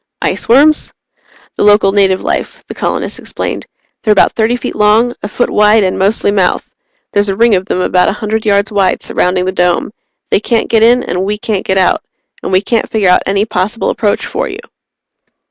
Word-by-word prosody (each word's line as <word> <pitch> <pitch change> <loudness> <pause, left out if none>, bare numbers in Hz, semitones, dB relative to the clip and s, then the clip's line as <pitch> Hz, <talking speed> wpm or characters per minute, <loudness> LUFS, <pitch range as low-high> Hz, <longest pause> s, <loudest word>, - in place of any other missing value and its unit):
"Iceworms?" 290 +6 +2 0.7
"The - - 0
local 205 -1 +4
native 195 -2 +2
life," - - -3
the - - -7
colonist - - -3
explained. - - -5 0.3
"They're 215 - +1
about 210 - +4
thirty 225 +2 +1
feet 245 - -5
long, 215 +3 +3
a - - -4
foot 245 +4 -2
wide, 210 +1 +4
and 185 - -1
mostly 200 +1 +1
mouth. 190 -3 0 0.5
There's 205 0 +1
a 195 - -1
ring 230 +2 +3
of 190 0 0
them 185 - -1
about 180 0 +2
a - - -1
hundred 215 0 -3
yards 205 +1 +1
wide 195 -3 0
surrounding 180 0 0
the 185 - -1
Dome. 180 +1 0 0.4
They - - +3
can't 230 +1 -1
get 225 -2 +2
in 240 +2 +4
and 180 -5 -3
we 205 +2 -2
can't 210 -2 -3
get 190 - +1
out 185 - +1 0.4
and - - -5
we 185 0 +3
can't 230 +2 -1
figure 210 -5 +1
out 180 - +4
any 200 +2 +1
possible 215 +1 -2
approach 210 -2 -1
for - - -3
you." - - -7
205 Hz, 195 wpm, -12 LUFS, 190-220 Hz, 0.7 s, local